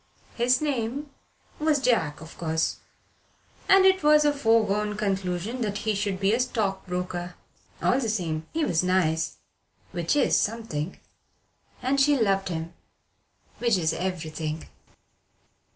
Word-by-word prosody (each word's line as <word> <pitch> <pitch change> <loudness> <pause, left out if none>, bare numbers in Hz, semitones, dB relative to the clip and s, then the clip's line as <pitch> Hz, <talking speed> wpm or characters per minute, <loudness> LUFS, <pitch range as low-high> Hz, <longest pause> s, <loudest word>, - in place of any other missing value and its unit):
His 250 +2 +2
name 280 0 -2 0.5
was 305 -1 +2
John, 220 - +1
of 160 +1 -11
course, 160 -1 -1 0.9
and 390 -1 +7
it 380 0 +5
was 300 0 +5
a 295 - +4
foregone 215 -5 +2
conclusion 195 +3 -2
that 205 -3 -1
he 215 0 -1
should 200 -2 -2
be 195 +1 +2
a 235 - +2
stock 210 -7 -1
broker. 180 -1 -4 0.5
All 255 - +3
the 230 -4 -1
same, 165 -6 -2
he 320 -1 0
was 165 - +1
nice, 165 -4 +1 0.6
which 170 - 0
is 290 - +3
something: 205 -8 -2 0.8
and 275 +2 +2
she 290 +1 +4
loved 195 -4 +1
him, 165 0 -4 0.9
which 235 -4 +2
is 160 -2 +1
everything. 160 -3 -4
205 Hz, 135 wpm, -26 LUFS, 175-250 Hz, 0.9 s, and